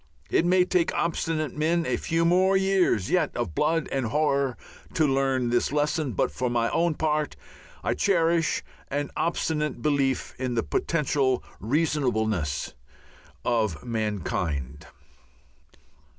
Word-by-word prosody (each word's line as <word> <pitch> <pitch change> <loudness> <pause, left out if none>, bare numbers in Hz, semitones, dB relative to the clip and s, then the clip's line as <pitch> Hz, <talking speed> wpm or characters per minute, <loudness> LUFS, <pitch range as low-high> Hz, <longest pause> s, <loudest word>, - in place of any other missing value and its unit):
It 175 - +3
may 180 0 +4
take 180 -2 +1
obstinate 160 -3 -1
men 165 +2 +1
a 125 - 0
few 165 +6 0
more 185 +3 +4
years 190 - +2
yet - - +1
of 80 - -2
blood 160 - +1
and 135 -3 0
horror 140 -1 +1 0.4
to 160 - +3
learn 135 -3 +1
this 120 +1 +1
lesson, 150 -2 0
but - - 0
for 125 -1 -2
my 115 -1 0
own 170 -1 +1
part 150 -1 0 0.5
I - - +1
cherish 170 -4 +2 0.2
an 145 0 -3
obstinate 150 -6 -1
belief 140 -3 +1
in 130 -2 -2
the 115 - +1
potential 140 -5 0 0.2
reasonableness 110 - 0 0.7
of 110 -6 0
mankind. 85 - -3
145 Hz, 125 wpm, -26 LUFS, 120-165 Hz, 0.7 s, may